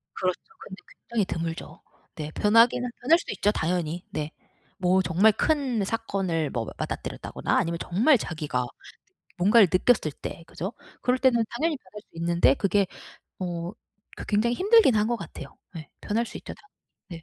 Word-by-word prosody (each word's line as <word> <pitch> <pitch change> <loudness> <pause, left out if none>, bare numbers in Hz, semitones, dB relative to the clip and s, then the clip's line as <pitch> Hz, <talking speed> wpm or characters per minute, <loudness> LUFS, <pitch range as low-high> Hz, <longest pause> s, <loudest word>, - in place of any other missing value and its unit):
그렇죠. 185 -2 -1 0.2
근데 190 - -10 0.3
굉장히 225 -4 +1
드물죠. 165 -2 -5 0.3
네. 155 -1 -5
변하기는 230 +6 +4
변할 310 +7 +5
수도 - - -6
있죠. 205 +1 +2
당연히 175 -2 -2
네. 150 0 -3 0.5
뭐 185 +1 +3
정말 190 +5 +4
큰 260 -3 0
사건을 195 -7 -1
뭐 115 -2 -3
맞닥뜨렸다거나 - - -3
아니면 170 0 0
정말 235 - +4
자기가 150 - -3 0.7
뭔가를 205 +3 +6
느꼈을 185 -4 +3
때 165 - -8
그죠? 190 +7 -5 0.3
그럴 250 +1 +2
때는 250 -3 +3
당연히 305 +5 -1
변할 210 -2 -13
수 - - -39
있는데 170 -5 +3
그게 195 +3 +2 0.5
어 175 -1 -4 0.4
그 - - -7
굉장히 220 +3 +2
힘들기는 395 - +5
한 210 - +2
것 240 +1 0
같아요. 160 -8 -9 0.2
예 155 -2 -8
변할 230 +3 -1
수 - - -9
있죠 - - -8 0.6
당연히. 165 -2 -9
195 Hz, 335 characters per minute, -26 LUFS, 170-235 Hz, 0.7 s, 뭔가를